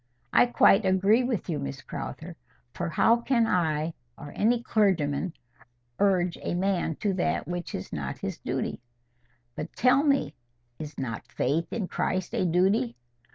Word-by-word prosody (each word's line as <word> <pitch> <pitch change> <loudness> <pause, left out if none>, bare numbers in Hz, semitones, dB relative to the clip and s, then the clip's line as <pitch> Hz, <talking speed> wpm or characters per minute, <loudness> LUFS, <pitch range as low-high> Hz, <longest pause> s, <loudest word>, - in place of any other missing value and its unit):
"I - - +6
quite 220 -3 +5
agree 195 +5 +3
with 245 -5 -2
you, 165 -4 -2
Miss 70 0 -5
Crowther. - - -7 0.4
For - - -3
how 225 +8 +4
can 235 -1 +2
I, 160 -5 0 0.2
or 145 - -9
any 235 +2 +2
clergyman, 185 -7 +1 0.7
urge 185 -3 +2
a - - -2
man 180 -3 0
to 205 -2 +1
that 185 - -1
which 175 0 -4
is 95 - -7
not 70 -3 -4
his - - -5
duty? - - -3 0.7
But - - -6
tell 255 +3 +4
me, 275 - +2 0.5
is 150 -1 -7
not 115 -4 -4
faith 155 +6 -1
in 205 -5 -2
Christ 185 0 -2
a - - +1
duty? 180 - +2
185 Hz, 155 wpm, -27 LUFS, 155-215 Hz, 0.7 s, I